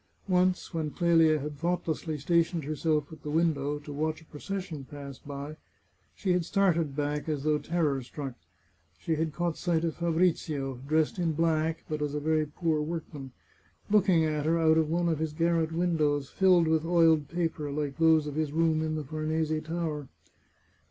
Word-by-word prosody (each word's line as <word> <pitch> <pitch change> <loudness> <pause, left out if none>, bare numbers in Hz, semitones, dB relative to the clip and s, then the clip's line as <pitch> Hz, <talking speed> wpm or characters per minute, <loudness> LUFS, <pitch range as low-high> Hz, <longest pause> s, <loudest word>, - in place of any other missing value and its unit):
Once, 185 0 +1
when 160 -2 -1
Qelia 165 -1 +3
had 145 0 -6
thoughtlessly 165 -2 -2
stationed 170 +2 +1
herself 150 +1 -1
at - - -12
the 150 - -6
win 165 +2 +3
dow, 145 +1 -3
to 145 0 -9
watch 155 +2 -2
a 160 - -18
procession 160 -1 -6
pass 140 -1 -9
by, 145 +2 -7 0.6
she 190 - -1
had 180 -1 +1
started 170 -6 +1
back, 150 +1 -2
as 145 -3 -2
though 150 0 +2
terror 150 -3 0
struck. 135 +1 -6 0.6
She 165 - -2
had 160 0 -1
caught 175 +1 -2
sight 170 -2 0
of 165 -1 -1
Fabrizio, 160 -6 0
dressed 160 +6 +1
in 165 -2 +1
black, 160 0 0
but 155 -1 -3
as 150 0 -2
a - - 0
very 155 0 +1
poor 155 0 -1
workman, 150 -4 -5 0.6
looking 190 -6 +4
at 150 -1 -1
her 165 +1 +3
out 160 -1 +4
of 155 -1 +1
one 170 +1 +1
of 160 -3 0
his 160 -1 -2
garret 165 0 +1
windows, 155 -5 0
filled 185 -4 +4
with 160 -1 +2
oiled 165 -3 +4
paper, 165 -3 -2
like 145 0 -3
those 160 -2 +5
of 150 - -4
his 155 -1 -1
room 160 0 +2
in 155 0 -1
the 155 - -3
Farnese 155 +2 -1
Tower. 160 -3 -3
160 Hz, 180 wpm, -29 LUFS, 150-165 Hz, 0.6 s, those